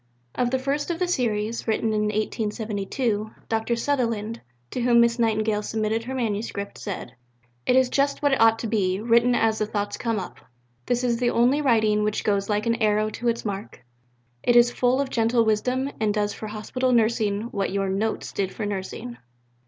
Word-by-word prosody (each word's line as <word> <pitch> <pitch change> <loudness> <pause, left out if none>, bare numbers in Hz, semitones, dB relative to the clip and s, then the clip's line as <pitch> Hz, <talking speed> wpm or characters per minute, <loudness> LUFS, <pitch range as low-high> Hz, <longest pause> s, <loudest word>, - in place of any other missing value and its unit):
Of 245 - 0
the 260 - +1
first 280 +4 -2
of 340 - -1
the 360 +1 0
series, 230 -8 -1
written 220 0 +1
in 210 0 +1
1872, 215 +1 -2 0.2
Dr. 225 +1 0
Sutherland, 230 -4 -1 0.3
to 250 - -3
whom 240 -1 +4
Miss 235 0 +3
Nightingale 215 -2 +1
submitted 220 +1 -1
her 265 +2 -4
manuscript, 210 -4 -3
said: 190 - -6 0.5
"It 250 - +4
is 260 -1 +5
just 280 +2 +1
what 285 - +4
it 270 - +2
ought 225 0 +6
to 225 - -4
be, 195 -4 0
written 235 +2 +3
as 225 -2 +2
the 215 - 0
thoughts 205 -1 -3
come 230 -2 -1
up. 185 - -6 0.5
This 245 0 0
is 240 -2 +1
the 245 0 +1
only 250 +6 +3
writing 220 -6 +3
which 210 0 -1
goes 200 -1 0
like 210 0 0
an 230 0 0
arrow 215 0 +2
to 240 - -4
its 235 0 0
mark. 200 - -6 0.6
It 240 - +2
is 240 0 +6
full 250 +2 +1
of 275 -1 -1
gentle 230 0 +2
wisdom 250 +5 0
and 215 -2 +1
does 205 -1 0
for 215 - -7
Hospital 220 +5 -2
nursing 220 -3 +2
what 200 -4 -1
your 195 0 0
Notes 200 +4 -2
did 190 -1 -2
for 220 - -4
nursing." 205 +4 -5
225 Hz, 190 wpm, -24 LUFS, 210-245 Hz, 0.6 s, ought